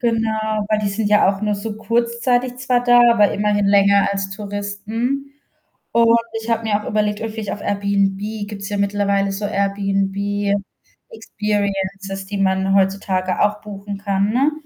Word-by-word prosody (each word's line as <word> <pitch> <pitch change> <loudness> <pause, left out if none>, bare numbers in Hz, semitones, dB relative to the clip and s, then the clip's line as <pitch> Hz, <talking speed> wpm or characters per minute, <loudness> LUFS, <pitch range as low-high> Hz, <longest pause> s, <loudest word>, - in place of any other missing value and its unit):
Genau, 220 -2 0
weil 215 -1 +2
die 210 - 0
sind 205 +1 -1
ja 210 -2 +4
auch 195 0 0
nur 210 0 +1
so 210 +1 -5
kurzzeitig 235 +3 0
zwar 250 -1 +1
da, 245 0 +6
aber 210 -3 +4
immerhin 205 0 +1
länger 200 0 +4
als 195 -1 -3
Touristen 210 +7 -4 0.6
und 235 0 +4 0.3
ich 225 - -7
habe 230 0 +1
mir 210 -1 0
auch - - -8
überlegt, 210 0 0
ob 225 - -2
ich 210 -2 -3
auf 205 - -5
Airbnb 200 -1 0 0.3
gibt's 200 -1 -7
ja 205 - -2
mittlerweile 200 0 +1
so 200 +1 -3
Airbnb 200 0 0 0.6
Experiences, 200 - -3
die 200 0 -4
man 190 0 +1
heutzutage 190 -1 0
auch 210 0 +1
buchen 200 -1 -7
kann, 200 0 0
ne? 270 +5 +2
205 Hz, 160 wpm, -20 LUFS, 200-220 Hz, 0.6 s, da